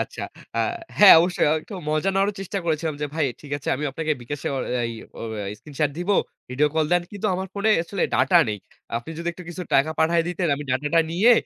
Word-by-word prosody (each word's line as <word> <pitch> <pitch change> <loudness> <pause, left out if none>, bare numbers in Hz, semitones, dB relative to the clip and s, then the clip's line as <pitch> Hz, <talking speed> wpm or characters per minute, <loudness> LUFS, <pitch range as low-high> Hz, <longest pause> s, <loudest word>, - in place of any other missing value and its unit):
আচ্ছা। - - -4 0.3
আ - - +2 0.4
হ্যাঁ, 205 -4 +11
অবশ্যই 180 +1 +1
একটু 205 - -10
মজা 155 +5 +1
নেওয়ারও 195 +1 +2
চেষ্টা 195 +1 -3
করেছিলাম 160 -1 -1
যে, 150 - 0
"ভাই 160 - +1 0.2
ঠিক 145 - -12
আছে 140 - -7
আমি 150 - -4
আপনাকে 155 +3 -1
bKash 140 +4 -6
এ - - +2 0.3
আ - - 0
এই 115 - -4 0.3
অ - - -6 0.4
স্ক্রিনশট 145 +3 -2
দিবো। 185 +3 +1 0.4
ভিডিও 145 +4 +2
কল 160 -1 +2
দেন 175 0 +4
কিন্তু 205 +1 -3
আমার 190 +1 -3
ফোনে 205 +2 +1
আসলে 185 +2 -3
ডাটা 180 - +5
নেই। 105 -1 -2 0.4
আপনি 120 +7 -6
যদি 170 0 -3
একটু 180 - -11
কিছু 175 +1 -6
টাকা 140 +3 +4
পাঠায় 165 +1 +3
দিতেন 180 0 -1
আমি 145 +1 -6
ডাটাটা 150 +6 +2
নিয়ে 200 +9 +5
165 Hz, 215 wpm, -23 LUFS, 150-185 Hz, 0.4 s, হ্যাঁ